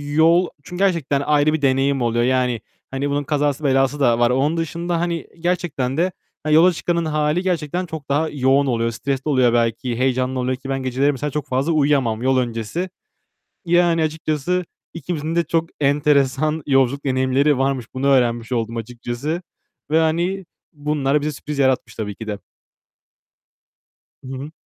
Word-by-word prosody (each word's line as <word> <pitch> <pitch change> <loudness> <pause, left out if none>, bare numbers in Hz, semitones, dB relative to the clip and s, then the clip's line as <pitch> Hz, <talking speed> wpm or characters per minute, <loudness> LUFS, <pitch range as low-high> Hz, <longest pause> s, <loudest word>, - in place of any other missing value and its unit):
yol 170 +3 +5 0.2
çünkü 180 +5 -3
gerçekten 160 -7 +1
ayrı 150 +1 +2
bir 155 - -1
deneyim 135 0 +2
oluyor. 120 0 +1
Yani 125 -2 +1 0.3
hani 135 +2 -2
bunun 145 +1 0
kazası 145 0 0
belası 135 +1 +2
da 120 -4 +3
var. 120 0 +4
Onun 140 +6 +1
dışında 170 +1 -2
hani 170 -1 -2
gerçekten 165 -7 -1
de 180 +3 +2 0.3
hani 155 0 +2
yola 175 +3 +6
çıkanın 170 0 -1
hâli 155 +2 0
gerçekten 180 -1 -1
çok 160 -4 -8
daha 155 +3 +1
yoğun 135 0 +2
oluyor. 115 -2 0
Stresli 135 +4 -3
oluyor 130 -4 +3
belki, 115 +1 0
heyecanlı 130 0 0
oluyor 125 +1 0
ki 135 +1 -9
ben 135 -1 -2
geceleri 130 +3 +1
mesela 145 +1 -4
çok 150 0 -3
fazla 135 +5 0
uyuyamam 140 -7 +2
yol 130 +1 +2
öncesi. 120 - -2 0.8
Yani 170 -1 +3
açıkçası 155 +3 -1 0.3
ikimizin 165 -1 -4
de 170 - +3
çok 165 0 -1
enteresan 145 +1 +2
yolculuk 135 0 +2
deneyimleri 130 +2 +2
varmış. 135 -2 0
Bunu 130 +2 -1
öğrenmiş 120 -3 +2
oldum 115 -1 -1
açıkçası 120 +7 -4 0.5
ve 160 - +4
hani 175 +4 0 0.3
bunlar 145 -1 0
bize 150 +1 -1
sürpriz 145 0 -6
yaratmış 130 -1 +1
tabii 105 -2 -4
ki 110 - -9
de. 105 -2 -4 1.8
Hı - - -10
hı. 145 +3 -7
140 Hz, 160 wpm, -21 LUFS, 130-160 Hz, 1.8 s, yola